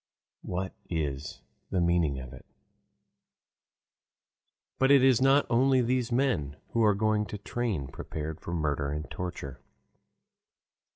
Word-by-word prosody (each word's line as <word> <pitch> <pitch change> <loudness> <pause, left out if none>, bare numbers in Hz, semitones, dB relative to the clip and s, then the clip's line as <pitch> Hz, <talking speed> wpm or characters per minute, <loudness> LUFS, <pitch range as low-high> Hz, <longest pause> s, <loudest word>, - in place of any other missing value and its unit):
What 95 +2 -4 0.2
is 75 -4 -3 0.3
the 95 - 0
meaning 85 -5 +2
of 65 -1 -9
it? 65 - -13 2.3
But 135 - +4
it 140 -2 +7
is 130 -2 +5
not 135 +2 +5
only 130 +2 +3
these 125 0 0
men 120 - +1
who 115 - +1
are 105 -2 +4
going 105 0 +1
by 105 - -6
train 110 - -2
prepared 75 +3 -6
for - - -6
murder 75 -4 -1
and 75 +2 -4
torture. 85 -7 -6
90 Hz, 125 wpm, -29 LUFS, 75-120 Hz, 2.3 s, it